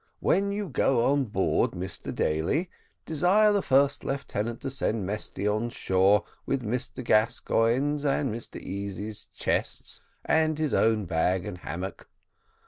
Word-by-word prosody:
When 200 +1 +2
you 205 0 -3
go 125 -4 +2
on 140 -1 +2
board, 95 -4 +1
Mr 90 +1 -5
Daly, 110 - 0 0.3
desire 185 +7 +4
the 200 - +2
first 140 0 +2
lieutenant 120 -4 -3
to 135 -2 -4
send 115 -6 -1
Mesty 105 0 -3
on 110 +3 0
shore 95 -1 +3 0.2
with 135 -2 -1
Mr 125 +2 -3
Gascoigne's 115 +5 +2
and 140 -4 +1
Mr 115 +1 -5
Easy's 100 +2 -6
chests, - - -2 0.2
and 155 -1 +2
his 155 -2 -1
own 110 -2 +3
bag 85 +2 0
and 95 -4 -6
hammock. 90 +2 -6
115 Hz, 135 wpm, -27 LUFS, 100-140 Hz, 0.3 s, desire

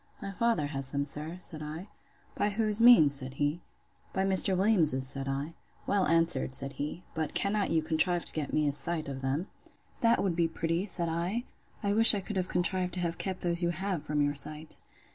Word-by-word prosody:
My 195 - -6
father 225 -5 0
has 135 -2 -5
them, 140 0 -2
sir, 150 +4 -4
said 160 -4 -2
I.—By 170 +6 -6
whose 215 0 -1
means? 230 - +7
said 135 -1 +1
he—By 160 +5 -4
Mr. 190 0 +3
Williams's, 170 - +4
said 135 +1 0
I. 140 +4 -3 0.3
Well 200 -2 +1
answered, 165 -5 +2
said 135 +1 +2
he. 150 +5 -5
But 160 -2 -3
cannot 200 0 0
you 160 -1 +1
contrive 170 +2 0
to - - -5
get 150 -3 -3
me 150 -1 +1
a 145 - 0
sight 160 +1 -2
of 135 -1 -6
them? 135 +6 -1 0.5
That 230 -1 +3
would 185 -4 0
be 170 -1 +2
pretty! 165 +3 -2
said 175 -3 0
I. 175 +8 -2 0.4
I 200 0 +1
wish 225 +1 +7
I - - -1
could 195 +1 -5
have 185 -1 -1
contrived 180 0 -1
to - - -4
have 170 -1 -3
kept 190 -1 -4
those 170 0 0
you 170 - +1
have 185 0 -2
from 150 0 -1
your 145 0 0
sight. 150 +2 -3
170 Hz, 200 wpm, -29 LUFS, 150-190 Hz, 0.5 s, means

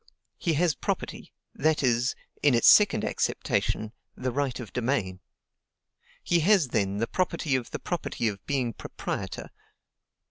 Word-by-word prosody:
He 170 - 0
has 165 +1 +2
property; - - -4 0.2
that 155 -1 +1
is, 120 -1 +2 0.3
in 145 -4 +4
its 115 - +4
second 210 -1 +6
acceptation, 110 -1 -1 0.2
the 130 0 -2
right 135 -1 -1
of 115 -5 -8
domain. 115 -7 -1 1.0
He 175 - +2
has, 175 -4 +4
then, 100 -3 0
the 115 - +1
property 165 -3 -1
of 125 -3 -2
the - - -4
property 170 -8 -3
of 100 -2 -4
being 130 -5 0
proprietor. - - -5
130 Hz, 140 wpm, -27 LUFS, 115-155 Hz, 1.0 s, second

